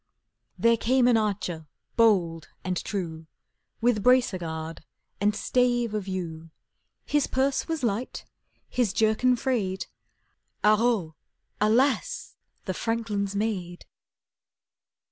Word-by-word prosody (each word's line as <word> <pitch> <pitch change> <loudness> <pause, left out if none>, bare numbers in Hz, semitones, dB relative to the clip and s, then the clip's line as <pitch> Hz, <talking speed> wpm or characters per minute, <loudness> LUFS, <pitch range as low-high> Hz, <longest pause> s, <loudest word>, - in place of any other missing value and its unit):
There 230 0 +4
came 250 +2 +3
an 245 - +5
archer 185 -7 -1 0.3
bold 175 -8 +3 0.2
and 185 -1 -1
true, 165 -4 -4 0.5
With 235 -3 +2
bracer 250 -4 +4
guard 160 -1 -5 0.4
and 205 +1 +2
stave 240 -2 +1
of 210 -2 -3
yew; 165 -4 -5 0.6
His 295 -2 +1
purse 265 +1 0
was 325 -4 -3
light, 230 +2 -2 0.4
his 240 -6 0
jerkin 225 +4 +3
frayed— 220 -7 -1 0.8
Haro, 215 -6 +3 0.4
alas! 260 - +1 0.3
the - - -2
franklin's 210 -4 -2
maid! 190 -5 -3
215 Hz, 105 wpm, -27 LUFS, 185-245 Hz, 0.8 s, an